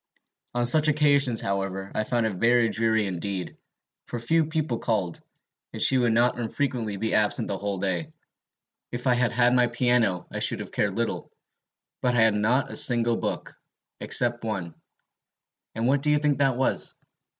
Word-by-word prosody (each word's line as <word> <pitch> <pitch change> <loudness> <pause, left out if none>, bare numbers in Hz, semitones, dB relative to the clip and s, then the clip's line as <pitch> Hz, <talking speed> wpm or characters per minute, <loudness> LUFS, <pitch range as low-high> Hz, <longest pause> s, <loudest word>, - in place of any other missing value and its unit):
"On 120 0 +1
such 150 +5 +4
occasions, 140 -5 +2
however, 95 0 -3
I 110 - -2
found 120 -1 0
it 110 - -1
very 115 +2 +3
dreary 110 -1 +1
indeed, 95 -1 -4 0.5
for 120 - -5
few 160 +8 +1
people 155 -6 -2
called, 100 -7 -2 0.5
and - - -7
she 130 - +5
would 120 -2 +2
not 120 +2 +2
unfrequently 120 -3 -3
be 110 +3 -2
absent 105 -1 +1
the 95 - -3
whole 100 -1 -3
day. 90 -4 -2 0.8
If 120 +1 -6
I 125 - +4
had 120 -2 +1
had 120 +1 +3
my 125 -1 +3
piano, 120 -6 +1
I - - -4
should - - +1
have - - -7
cared - - -1
little; - - -3 0.7
but 125 -1 +1
I 120 - +3
had 110 -1 +4
not 115 +6 0
a - - -6
single 120 -2 +3
book, - - -4 0.5
except 120 -1 +1
one 95 -7 -4 1.0
and 115 +1 -2
what 135 +2 +2
do 150 - +2
you 150 - +4
think 145 -1 0
that 135 -3 +2
was? 130 - 0
120 Hz, 175 wpm, -25 LUFS, 105-125 Hz, 1.0 s, she